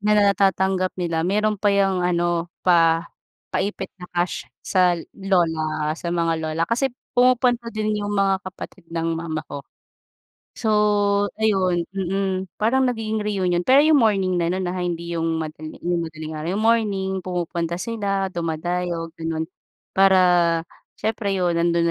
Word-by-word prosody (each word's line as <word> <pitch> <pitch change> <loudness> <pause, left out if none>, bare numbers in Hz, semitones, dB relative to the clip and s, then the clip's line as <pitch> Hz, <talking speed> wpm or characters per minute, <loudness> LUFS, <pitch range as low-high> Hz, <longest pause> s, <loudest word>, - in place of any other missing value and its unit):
na 210 +1 +3
natatanggap 190 -2 +2
nila, 170 -3 -1
meron 210 +4 0
pa 205 - +3
yung 195 -2 +2
ano 175 -1 0 0.2
pa, 165 -2 +4 0.5
pa-ipit 200 +3 -2
na 180 - -9
cash 175 +1 -1 0.2
sa 180 -2 +3 0.2
lola, 160 -5 0
sa 170 +2 -6
mga 170 -1 +1
lola 160 +1 -2
kasi 240 +7 0 0.2
pumupunta 245 -1 +3
din 215 -1 -2
yung 205 0 -2
mga 195 -1 +2
kapatid 185 -2 -10
ng 165 0 -2
mama 160 -1 -4
ko. 145 - -7 1.0
So 220 - -2 0.7
ayun, 190 -5 +1
mm, 190 0 -2
parang 260 +5 +3
nagiging 220 -3 -2
reunion 185 -4 0
pero 270 +2 +6
yung 310 -2 +5
morning 195 -5 +2
na 170 0 0
no'n, 185 -1 -2
ha, 185 - -3
hindi 170 0 -3
yung 165 0 -1
madali 155 0 -8
yung 175 0 0
madaling 155 -1 -7
araw, 155 +2 -4
yung 210 +2 -1
morning 210 -4 +2
pumupunta 170 -1 -2
sila, 195 -1 -2
dumadayo 170 0 -2
gano'n. 160 0 -2 0.5
Para 190 -1 +5 0.8
siyempre 215 -2 -2
'yon 175 -2 +1
nandun 170 0 +2
185 Hz, 145 wpm, -22 LUFS, 170-205 Hz, 1.0 s, pero